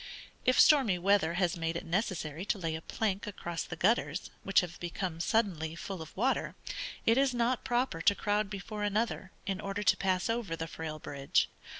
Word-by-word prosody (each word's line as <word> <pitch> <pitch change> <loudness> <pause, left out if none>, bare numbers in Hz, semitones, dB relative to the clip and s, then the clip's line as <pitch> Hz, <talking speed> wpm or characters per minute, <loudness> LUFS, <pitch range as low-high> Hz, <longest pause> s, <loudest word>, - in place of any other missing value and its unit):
If 255 - +4
stormy 260 -11 +6
weather 175 -2 +3
has 180 -2 +1
made 165 -1 -2
it 170 - -4
necessary 170 -3 -2
to 210 - 0
lay 165 -4 -2
a 160 - -4
plank 200 +2 -2
across 175 -4 -4
the 175 - -5
gutters, 180 -3 +1
which 195 - +4
have 180 -1 -7
become 175 -1 -3
suddenly 170 -6 0
full 185 +1 -6
of 160 - -10
water, 255 +6 +1 0.5
it 230 +3 +5
is 270 -2 +2
not 240 +1 +1
proper 245 -9 0
to 200 - +4
crowd 210 0 0
before 210 +1 -6
another, 205 -1 -1
in 195 0 -2
order 200 0 -3
to 180 - +4
pass 185 -1 +1
over 230 -7 -1
the 165 - -4
frail 160 -1 -6
bridge. 140 -2 0
195 Hz, 190 wpm, -31 LUFS, 165-215 Hz, 0.5 s, stormy